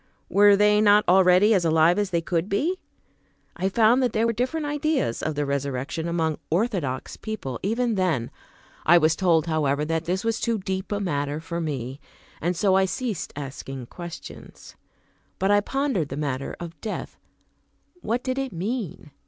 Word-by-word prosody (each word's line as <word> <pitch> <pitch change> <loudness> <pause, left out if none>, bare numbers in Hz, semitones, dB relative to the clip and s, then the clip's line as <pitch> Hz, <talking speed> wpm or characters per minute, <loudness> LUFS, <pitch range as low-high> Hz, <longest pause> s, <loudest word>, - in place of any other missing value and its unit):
Were 205 0 +6
they 210 +1 +4
not 210 0 +5
already 185 +3 +5
as 190 -4 +2
alive 165 +3 +4
as 205 -2 0
they 170 -3 0
could 170 +2 -1
be? 320 - 0 0.8
I 190 +2 -1
found 230 +5 +4
that 250 -3 +1
there 220 +1 +2
were 230 - +1
different 260 +7 -2
ideas 295 - -1
of 155 - -2
the 145 0 -1
resurrection 140 +3 -2
among 165 -2 -1
"orthodox" 170 - -1
people, 165 - -5
even 230 +4 0
then. 175 - 0 0.5
I 175 +2 +6
was 160 -1 +3
told 165 -4 +2
however, 150 -3 0
that 165 +1 -1
this 185 +2 -1
was 225 0 0
too 230 -1 0
deep 190 0 -4
a 205 - 0
matter 145 -6 -2
for 170 +1 -4
me, 135 -4 -4 0.4
and 175 +2 -1
so 195 +1 +3
I 190 0 +4
ceased 215 +1 -3
asking 135 -2 -7
questions. 175 -1 -10 0.6
But 195 +1 +1
I 205 0 +5
pondered 260 - -1
the 135 - -5
matter 140 -2 -3
of 170 -3 -9
death; 215 - -5 0.8
what 235 +3 -1
did 260 0 -2
it 270 -1 -3
mean? 185 - -4
180 Hz, 170 wpm, -25 LUFS, 155-215 Hz, 0.8 s, Were